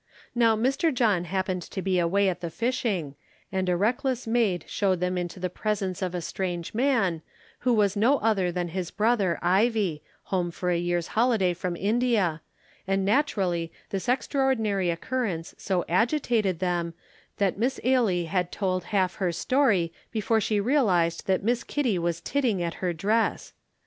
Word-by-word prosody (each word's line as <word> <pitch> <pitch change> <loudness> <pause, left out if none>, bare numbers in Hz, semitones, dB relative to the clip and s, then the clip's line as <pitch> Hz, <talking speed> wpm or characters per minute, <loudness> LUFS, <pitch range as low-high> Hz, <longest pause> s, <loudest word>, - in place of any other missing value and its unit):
Now 230 -2 +4
Mr. 270 +8 +1
John 215 - +2
happened 185 0 -2
to 190 - -7
be 185 -1 +1
away 195 +4 +2
at 180 -2 -1
the 170 - -3
fishing, 215 - -1 0.4
and 190 -1 -1
a 175 - +2
reckless 245 +5 0
maid 225 -8 +1
showed 190 -3 0
them 180 +1 -1
into 175 +1 -4
the 180 - -1
presence 195 -1 -2
of 180 -1 -2
a 175 - -2
strange 175 -1 -4
man, 225 - +1 0.4
who 250 - +1
was 205 -3 +3
no 235 +8 +4
other 200 -7 +1
than 175 0 -2
his 180 0 -3
brother 210 -5 +1
Ivie, 190 -3 +2 0.2
home 180 -2 -1
for 180 +1 -2
a 175 - +2
year's 175 -1 -1
holiday 220 -6 +2
from 175 0 -3
India, 205 -5 +1 0.5
and 195 0 +1
naturally 195 - +1 0.2
this 195 +4 -3
extraordinary 245 -7 +1
occurrence 175 -2 -2
so 185 -3 -1
agitated 225 - +1
them 175 -1 -1 0.4
that 200 -2 0
Miss 255 +4 0
Ailie 230 -9 +2
had 180 +1 -1
told 185 -3 -1
half 190 -4 0
her 185 -4 0
story 190 - +2 0.2
before 220 0 +1
she 210 0 +1
realized 200 - +2
that 190 0 +1
Miss 240 +3 +1
Kitty 245 -11 0
was 170 -1 -1
titting 250 -9 0
at 170 -1 -2
her 180 -2 +1
dress. 210 +7 0
195 Hz, 165 wpm, -26 LUFS, 175-230 Hz, 0.5 s, Now